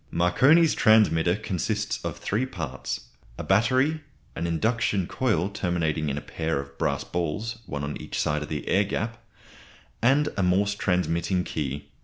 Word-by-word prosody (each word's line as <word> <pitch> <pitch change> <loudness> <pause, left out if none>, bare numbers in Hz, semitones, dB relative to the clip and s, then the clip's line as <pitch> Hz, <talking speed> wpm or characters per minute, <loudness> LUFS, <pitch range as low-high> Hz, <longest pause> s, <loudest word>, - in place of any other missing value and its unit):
Marconi's 130 - +4
transmitter 90 -6 +4
consists 105 +1 -2
of - - -4
three 115 +6 -1
parts 80 - -5 0.4
a - - -5
battery; 130 +10 +2 0.3
an 85 - -2
induction 105 +2 0
coil, 95 -6 0
terminating 85 -6 -1
in 70 - -2
a - - -3
pair 80 -3 -2
of 70 0 -8
brass - - 0
balls, 95 +8 -3
one 70 -1 -4
on 70 +1 -3
each - - -5
side 75 0 0
of 75 - -6
the 75 -2 -4
air 100 - +3
gap; 110 +3 -4 0.8
and 145 +4 +3
a 95 - 0
Morse 95 +3 +2
transmitting 90 -2 0
key. 75 -3 -4
90 Hz, 155 wpm, -26 LUFS, 80-110 Hz, 0.8 s, Marconi's